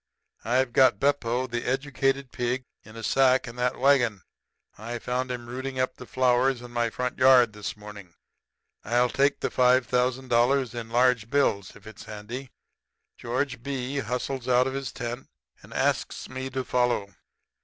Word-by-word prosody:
'I've 120 +2 +1
got 130 0 +5
Beppo, 130 -3 +1
the 120 -1 -4
educated 135 0 -1
hog, 125 +1 -1 0.2
in 110 - -14
a 115 - -8
sack 130 0 +3
in 115 - -8
that 125 0 0
wagon. 120 - +3 0.5
I 115 +3 -6
found 125 +2 -2
him 120 -1 -5
rooting 130 +2 -5
up 130 - -1
the 125 - -10
flowers 125 0 +2
in 120 - -10
my 120 -1 0
front 125 +3 -4
yard 130 -3 +6
this 105 0 -6
morning. 105 -4 -11 0.7
I'll 120 +3 +2
take 140 +4 +1
the - - -1
five 125 0 +4
thousand 125 +2 0
dollars 125 +2 +2
in 115 -2 -6
large 120 -2 +2
bills, 110 -8 +1
if 105 - -16
it's 110 -1 -11
handy.' 115 +5 -7 0.7
"George 125 0 -3
B. 135 +1 -3
hustles 125 0 -3
out 125 0 +4
of 135 - -2
his 135 -2 -4
tent, 120 +2 -6 0.3
and - - -16
asks - - -1
me 130 0 -5
to 130 0 -3
follow. 120 -6 0
125 Hz, 165 wpm, -26 LUFS, 120-130 Hz, 0.7 s, yard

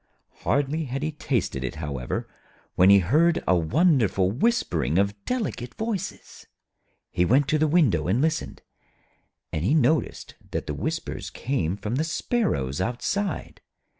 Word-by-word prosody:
Hardly 145 +3 0
had 135 +2 -4
he 155 - -1
tasted 125 - -2
it, 65 - -4
however, 70 -5 -4 0.5
when 90 +2 +5
he 100 - +8
heard 155 - +3
a 90 - +5
wonderful 105 - +2
whispering 100 - +1
of 100 +1 +2
delicate 205 - -3
voices. 215 -4 -5 0.6
He 90 - +1
went 130 +9 +3
to 155 - +2
the 155 - +3
window 140 - +3
and 100 +7 +2
listened, 160 +3 -1 0.9
and 80 - -1
he 120 - +2
noticed 155 +2 +1 0.2
that - - -3
the 75 - -3
whispers 70 - -4
came 100 - -2
from 105 +4 -3
the 155 - +1
sparrows 160 - -1
outside. 150 - -2
125 Hz, 140 wpm, -25 LUFS, -, 0.9 s, he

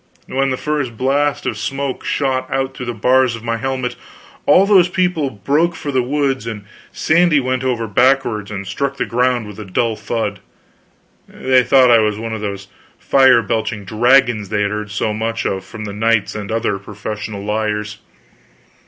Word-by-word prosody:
When 135 +1 0
the 130 - -1
first 145 -7 -2
blast 140 +3 0
of - - -2
smoke 135 -1 -3
shot 135 -2 -1
out 135 0 -1
through 125 - -6
the 120 - -2
bars 125 +2 +3
of 115 - -10
my 115 -1 -1
helmet, 130 +1 -3 0.5
all 190 - +6
those 195 -4 +5
people 180 -6 0
broke 145 - 0
for 150 -3 -5
the 130 -2 +2
woods, 135 -2 -1
and 105 -3 -6 0.3
Sandy 165 -2 +3
went 130 -1 -1
over 120 -3 -1
backwards 120 -2 +2
and 100 -2 -5
struck 140 +9 -3
the - - -1
ground 125 -1 +1
with 105 0 -10
a - - -5
dull 110 +4 -1
thud. 105 -3 -3 0.9
They 130 -1 +2
thought 130 -1 +5
I 115 - +7
was 105 -1 +1
one 115 0 -5
of 110 - -4
those 100 -1 -5 0.3
fire 130 -3 +4
belching 110 -1 -2
dragons 120 -1 +3
they 105 -1 0
had 100 - -1
heard 105 0 -4
so 105 +1 -1
much 115 +1 -3
about 95 0 -2
from 110 +2 -8 0.2
knights 115 -2 +1
and 105 -1 -6
other 110 -3 -1
professional 105 0 -6
liars. 105 -1 -2
120 Hz, 180 wpm, -18 LUFS, 105-135 Hz, 0.9 s, I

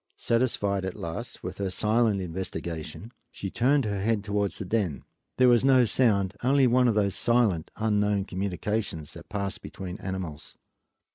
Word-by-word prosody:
Satisfied 105 -5 0
at 95 -1 -4
last 85 +9 -6
with 95 +2 -6
her 100 -1 -1
silent 105 +1 +2
investigation 90 +2 -5 0.2
she 95 - -6
turned 135 +2 +2
her 100 -2 -2
head 110 0 +1
towards 100 -1 -1
the 100 - -4
den. 95 -7 -1 0.3
There 130 - +6
was 120 -1 +5
no 130 -2 +5
sound, 100 -5 +2
only 135 +1 +4
one 125 +1 +4
of 115 - +2
those 100 -2 +2
silent, 115 -9 +2
unknown 105 -2 +1
communications 95 -3 -3
that 85 - -12
pass 100 -1 -3
between 90 -2 -7
animals. 90 -5 -6
100 Hz, 155 wpm, -27 LUFS, 95-115 Hz, 0.3 s, There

